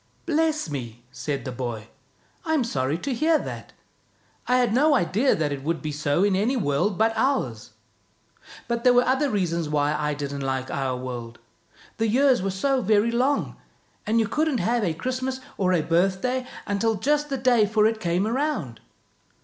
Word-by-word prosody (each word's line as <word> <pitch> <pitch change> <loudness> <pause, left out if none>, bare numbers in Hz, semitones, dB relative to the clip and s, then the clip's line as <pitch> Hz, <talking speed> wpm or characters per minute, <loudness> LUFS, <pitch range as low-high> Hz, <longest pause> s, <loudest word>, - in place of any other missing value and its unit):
" - - -38
Bless 315 - +1
me! 120 -5 -6
" - - -36
said 140 -3 -3
the 130 - -4
boy. 120 -3 -5 0.5
"I'm 315 -5 +1
sorry 140 - -1
to 270 +9 -3
hear 315 +6 +3
that. - - -7 0.8
I 250 - +3
had 245 -3 +2
no 290 +4 +4
idea 225 +5 +2
that 155 -2 -1
it 140 -1 -4
would 165 +2 -1
be 155 - -4
so 145 +4 0
in 200 -2 +3
any 225 +7 +1
world 175 - 0
but 225 +1 +2
ours. 220 - -1 0.9
But 235 0 -2
there 250 - +6
were 245 0 +5
other 265 +3 +2
reasons 170 - -1
why 150 0 +1
I 150 -1 -1
didn't 140 -1 -4
like 130 -1 -2
our 130 -2 -2
world. 120 -2 -6 0.6
The 225 - +1
years 260 +1 +3
were 195 - -1
so 260 +8 0
very 215 +2 +2
long, 260 +4 0 0.5
and 225 +2 +2
you 220 - +1
couldn't 305 0 0
have 235 0 0
a 165 -5 0
Christmas 255 +6 -3 0.2
or 185 -2 +1
a 170 -4 +2
birthday 195 +10 0 0.2
until 210 +2 0
just 295 +7 0
the 275 - -1
day 245 -4 +3
for 215 0 +2
it 220 0 +1
came 175 -1 0
round." 235 - -2
210 Hz, 185 wpm, -24 LUFS, -, 0.9 s, there